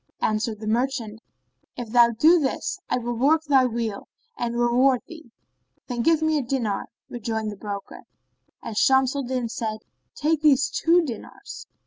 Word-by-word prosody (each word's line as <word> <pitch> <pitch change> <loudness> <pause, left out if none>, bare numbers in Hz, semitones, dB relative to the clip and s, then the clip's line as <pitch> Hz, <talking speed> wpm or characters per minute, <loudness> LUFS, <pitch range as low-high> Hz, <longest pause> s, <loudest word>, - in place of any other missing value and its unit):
Answered 215 0 -1
the 215 - -7
merchant, 230 -2 -1 0.6
"If 240 -3 -6
thou 235 0 +6
do 315 +10 +4
this, 270 -4 -2
I - - +1
will 240 0 -3
work 290 +7 +2
thy 270 -4 +4
weal—and 235 - -5
reward 245 +2 +3
thee." 320 -6 -13 0.6
"Then 240 -1 -3
give 320 +4 +3
me 315 -1 +2
a - - -1
dinar," 235 -5 -2 0.2
rejoined 220 -2 -4
the - - -8
broker, 200 0 -7 0.6
and 225 - -6
Shams 265 +3 +3
al 280 - -1
Din 250 -2 -2
said, 220 -1 -4 0.4
"Take 310 0 0
these 280 -3 +4
two 340 +1 +3
dinars." 310 - -8
245 Hz, 155 wpm, -24 LUFS, 225-285 Hz, 0.6 s, thou